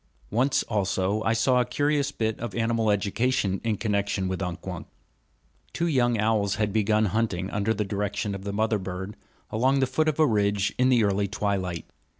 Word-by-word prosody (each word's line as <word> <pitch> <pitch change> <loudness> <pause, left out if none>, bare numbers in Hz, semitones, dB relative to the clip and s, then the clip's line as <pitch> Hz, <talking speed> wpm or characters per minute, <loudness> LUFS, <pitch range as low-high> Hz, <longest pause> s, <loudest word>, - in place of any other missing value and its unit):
Once 130 +5 +2
also 100 -1 0
I 110 - +3
saw 125 +3 +3
a - - +3
curious 145 +2 0
bit 110 -5 -2
of 115 -4 -5
animal 115 -1 +1
education 100 0 0
in 110 -3 0
connection 100 -2 -1
with 95 0 -3
Unk 90 -2 -4
Wunk. - - -6 0.9
Two 170 - -1
young 120 -7 +2
owls 105 -2 +1
had 105 -2 -1
begun 110 0 +2
hunting, 100 -3 -1
under 105 +2 0
direction 105 -1 -2
of 100 -1 -6
the 100 - -3
mother 110 +1 +1
bird, 95 +2 -6 0.4
along 130 +5 +2
the 135 - +3
foot 155 +4 0
of 155 - -3
a 155 - +6
ridge 105 -5 +1
in 130 0 +4
the 120 -3 +4
early 100 0 +1
twilight. 95 -4 -2
105 Hz, 180 wpm, -26 LUFS, 100-115 Hz, 0.9 s, a